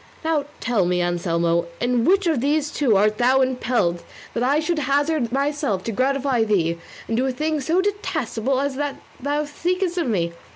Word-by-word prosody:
Now 315 -3 +1
tell 225 -7 +1
me, 180 0 +1
Anselmo, 170 -1 0
in 245 -1 +1
which 390 +2 +3
of 315 -8 +1
these 295 +2 +1
two 245 -9 +2
art 215 +2 +2
thou 255 +2 +4
imperilled, 245 -9 0 0.3
that 235 - -2
I 275 +4 +3
should 320 +1 -1
hazard 285 -2 +1
myself 275 -7 -1
to 230 - -3
gratify 260 +1 +1
thee, 170 -6 +1 0.3
and 225 - -1
do 255 +3 +1
a - - 0
thing 305 +3 -1
so 330 +7 +2
detestable 310 - -1
as 280 -1 -2
that 290 -1 -3 0.2
thou 290 +3 -1
seekest 355 +4 -1
of 330 - 0
me? 170 -7 0
265 Hz, 180 wpm, -22 LUFS, 220-300 Hz, 0.3 s, thou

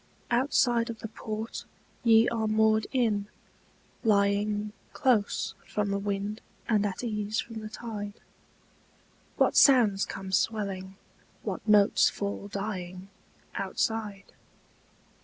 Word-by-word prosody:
Outside 240 -2 +2
of 230 - -5
the - - -4
port 220 +1 -6 0.4
ye 225 -1 +6
are 225 -2 -1
moored 220 0 +3
in, 220 -6 +1 0.8
lying 205 0 +2 0.2
Close 230 -6 +1
from 210 -1 -1
the 200 - 0
wind 205 +1 -3 0.3
and 210 -2 +2
at 195 +4 -5
ease 210 -2 -2
from 225 -1 -5
the 215 0 -7
tide, 215 -3 -6 1.2
What - - +3
sounds 225 -8 +6
come 190 -1 -6
swelling, 195 -2 -1 0.5
what - - -5
notes 205 -1 +5
fall 200 0 -4
dying 190 -2 -5 0.4
Outside? 205 +1 -2
210 Hz, 110 wpm, -28 LUFS, 200-225 Hz, 1.2 s, ye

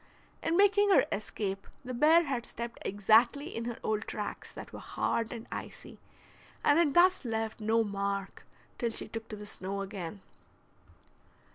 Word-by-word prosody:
In 330 +1 +1
making 405 +1 +5
her 390 - +6
escape 195 -1 -3 0.2
the 255 - -4
bear 310 +7 +6
had 265 -6 -2
stepped 235 0 -6
exactly 230 - +3
in 230 - -3
her 240 -1 -4
old 215 0 -1
tracks 210 -1 -5
that - - -10
were - - -7
hard 230 -1 -1
and 230 -1 -6
icy, - - -8 0.6
and 290 +3 +5
had 305 -5 +3
thus 365 0 +5
left 225 -2 -3
no 225 +1 +3
mark 200 -1 -3 0.4
till 235 - +1
she 225 - -2
took 225 0 -6
to 215 - -5
the 210 0 -9
snow 200 0 -4
again. 195 -1 -6
225 Hz, 160 wpm, -31 LUFS, 205-280 Hz, 0.6 s, her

